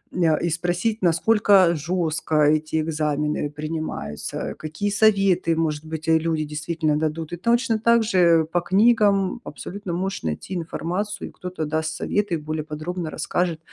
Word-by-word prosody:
ня, 165 -4 +3
и 170 - -1
спросить 175 +7 -1
насколько 185 0 +4
жестко 160 0 -2
эти 155 +1 +2
экзамены 150 -1 -1
принимаются. 150 - -5
Какие 155 +7 -3
советы 195 -6 +3
может 155 -1 -1
быть, 160 0 -6
э, 160 0 +5
люди 160 -1 -1
действительно 155 0 -1
дадут, 160 +1 -3
и - - -3
точно 235 +2 +1
также, 230 -3 +3 0.3
э, - - -6
по 175 +2 -1
книгам 205 +2 +3
абсолютно 195 -2 -7
можешь 190 - -3
найти 80 - -4
информацию, 180 +4 -3
и - - -16
кто-то 180 -3 -5
даст 160 +1 -2
совет 205 +3 -1
и 165 - +1
более 155 0 -4
подробно 160 +2 -5
расскажет. 170 -1 -1
165 Hz, 150 wpm, -23 LUFS, 155-195 Hz, 0.3 s, э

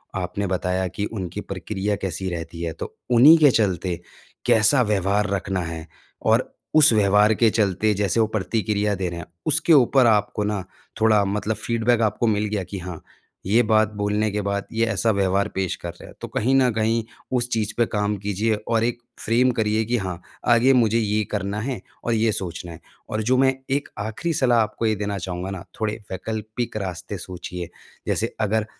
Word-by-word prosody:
आपने 95 +2 -2
बताया 95 0 -1
कि 100 +3 -3
उनकी 95 -6 -5
प्रक्रिया 105 0 -3
कैसी 95 0 -3
रहती 85 -1 -6
है। 80 -1 -2
तो - - -7 0.2
उन्हीं 140 +8 +8
के 145 -3 +6
चलते 95 -6 0 0.5
कैसा 115 +5 +5
व्यवहार 105 0 +1
रखना 95 -1 -1
है, 80 -1 -6 0.3
और 115 +3 +2 0.3
उस 155 -5 +7
व्यवहार 105 +1 +4
के 115 0 +4
चलते 105 0 +1
जैसे 100 +2 0
वो 110 - +4
प्रतिक्रिया 105 0 0
दे 90 -1 -2
रहे 85 0 -6
हैं, 85 - -7 0.2
उसके 160 +2 +3
ऊपर 130 -2 +5
आपको 105 -1 +2
ना 105 -2 -2 0.4
थोड़ा 110 -2 +5
मतलब 105 +2 -1
फीडबैक 115 +1 +1
आपको 120 - -1
मिल 105 -1 +1
गया 105 -2 -2
कि 95 +2 -7
हाँ, 90 -2 -7 0.5
ये 115 +5 +4
बात 110 -1 +3
बोलने 105 +1 0
के 105 - -1
बाद 100 0 -2
ये 115 +1 +2
ऐसा 115 0 +1
व्यवहार 100 0 +1
पेश 95 -2 -1
कर 85 - -4
रहे - - -14
हैं। - - -14
तो - - -5
कहीं 125 +5 0
न 130 -2 +4
कहीं 110 +1 +1 0.3
उस 120 0 -1
चीज़ 110 -2 -1
पे 120 - +4
काम 105 -1 -1
कीजिए। 105 +3 -1
और 115 -1 +2
एक 120 0 0 0.2
फ्रेम 125 +3 +2
करिए 110 +1 +1
कि 120 +2 0
हाँ, 90 -3 -4 0.3
आगे 120 +3 +5
मुझे 115 -2 +3
ये 105 0 +1
करना 100 0 -2
है 130 +1 -3 0.3
और 120 - +1
ये 110 0 +2
सोचना 85 -3 -5
है। 80 - -10 0.3
और 110 0 -1
जो 130 +3 +2
मैं 135 0 +4 0.2
एक 140 +1 0
आखिरी 110 +11 -2
सलाह 120 -5 +3
आपको 110 +1 -2
ये 110 - +2
देना 100 0 -3
चाहूँगा 90 +1 -4
ना, 95 -3 -6 0.2
थोड़े 105 -1 0 0.2
वैकल्पिक 110 +4 -4
रास्ते 90 -5 -5
सोचिए। 90 -1 -7 0.4
जैसे 115 +2 -1
अगर 110 0 +1
105 Hz, 190 wpm, -23 LUFS, 95-115 Hz, 0.5 s, उन्हीं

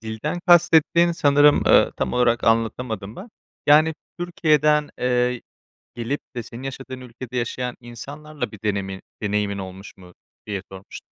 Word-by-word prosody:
dilden 110 +10 -4
kastettiğin, 170 -1 +5
sanırım, 145 -2 +4
ııı, - - +5
tam - - -2
olarak 120 -1 +2
anlatamadım 115 -2 -1
ben. 200 - -9 0.4
Yani, 155 +2 +5 0.2
Türkiye'den, 150 -4 +2
eee, 125 -1 0 0.5
gelip 120 +5 -3 0.2
de 120 - -4
senin 120 +4 -10
yaşadığın 135 -1 -7
ülkede 125 0 -8
yaşayan 125 +1 -3
insanlarla 140 +6 -7
bir 110 - -11
denemi 100 -2 -2 0.2
deneyimin 105 -1 -1
olmuş 95 +1 -9
mu 90 -1 -15 0.3
diye 100 -3 -3
sormuş 95 +1 -10
125 Hz, 135 wpm, -22 LUFS, 110-150 Hz, 0.5 s, kastettiğin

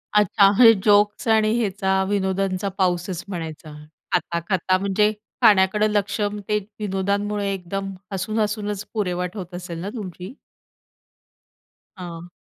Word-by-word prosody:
अच्छा, 200 -1 +5
हे 230 -2 +9
जोक्स 205 +1 +3
आणि 220 -1 +4
ह्याचा 190 -3 0
विनोदांचा 195 -1 0
पाऊसच 180 -1 0
म्हणायचा. 160 -5 -6 0.4
खाता-खाता 175 +2 0
म्हणजे 200 +2 +2 0.3
खाण्याकडं 205 +1 +5
लक्ष 205 0 -1 0.3
ते 210 - +3 0.2
विनोदांमुळे 200 0 -1
एकदम, 195 +1 -4 0.2
हसून 195 +3 -2
हसूनच 210 -1 -2
पुरेवाट 180 -3 -2
होत 180 -2 -7
असेल 175 -2 -6
ना 195 - -4
तुमची? 185 -1 -7 1.6
हां. 175 -2 -8
195 Hz, 110 wpm, -22 LUFS, 180-210 Hz, 1.6 s, हे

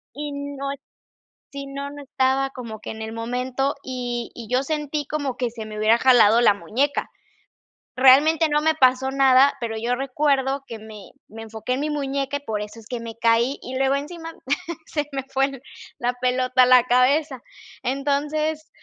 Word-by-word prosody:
y 295 +1 -5
no 280 -1 -5 0.8
sí, 280 0 -6
no, 280 +1 -5
no 290 0 -9
estaba 270 0 +1
como 230 -5 -8
que - - -7
en 220 - -8
el 220 0 -5
momento 250 +4 -2
y 245 -2 -4
y 230 -2 -8
yo 255 +2 +3
sentí 300 0 -2
como 285 -4 -2
que 245 -2 -1
se 225 -1 -8
me 215 0 -8
hubiera 220 +2 +4
jalado 235 -3 +5
la 210 - +6
muñeca, 265 +8 -1 0.9
realmente 290 +5 +6
no 295 0 +2
me 315 0 +2
pasó 260 -2 +3
nada, 270 0 +5
pero 230 -3 -3
yo 235 +3 -1
recuerdo 275 0 0
que 230 - -7
me 215 -2 -12 0.2
me 225 +1 -10
enfoqué 225 +3 -4
en 255 - -2
mi 305 - -1
muñeca 280 -1 -2
y - - -9
por 210 -1 -2
eso 210 +2 -8
es 220 - -15
que 245 -2 -4
me 230 -1 -7
caí 235 +4 +2
y 260 +1 -5
luego 270 +1 +2
encima 325 +3 -6 0.5
se 295 -2 -2
me 270 -1 -2
fue 270 -1 0 0.4
la 245 +1 0
pelota 255 0 +3
a - - +6
la 250 -1 +6
cabeza, 260 +2 +2 0.4
entonces, 295 +3 -1
265 Hz, 180 wpm, -23 LUFS, 240-280 Hz, 0.9 s, la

